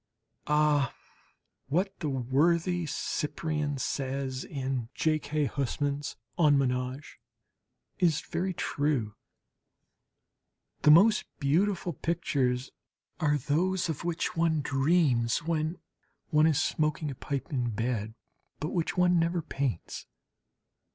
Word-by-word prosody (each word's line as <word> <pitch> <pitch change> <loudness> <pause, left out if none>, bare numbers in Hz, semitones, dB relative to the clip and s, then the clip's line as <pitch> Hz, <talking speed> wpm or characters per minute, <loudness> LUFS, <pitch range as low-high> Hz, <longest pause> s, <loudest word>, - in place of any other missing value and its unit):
Ah, 150 -3 +2 0.7
what 180 +8 0
the 155 - -2
worthy 165 +7 +1
Cyprian 150 0 -2
says 135 0 -2
in 130 -4 -3
J. 155 -1 +2
K. 150 0 -1
Huysmans' 140 +1 -2 0.2
"En 150 -4 +5
Ménage," 130 +1 -2 0.8
is 165 -4 +3
very 185 +2 -2
true! 145 - -1 1.7
"The - - +5
most 200 +8 +6
beautiful 175 +5 +1
pictures 135 -5 -1 0.5
are 150 -3 +2
those 170 +7 0
of 155 - -3
which 170 -1 -2
one 165 -2 +2
dreams 135 -3 +2
when 160 0 -1 0.5
one 155 0 +5
is 150 -3 +2
smoking 155 -1 0
a - - -5
pipe 140 +3 -4
in 125 -3 0
bed 110 -1 -2 0.4
but 155 - -2
which 170 -1 -1
one 180 -1 +4
never 170 0 0
paints." 135 - -3
150 Hz, 110 wpm, -29 LUFS, 135-165 Hz, 1.7 s, most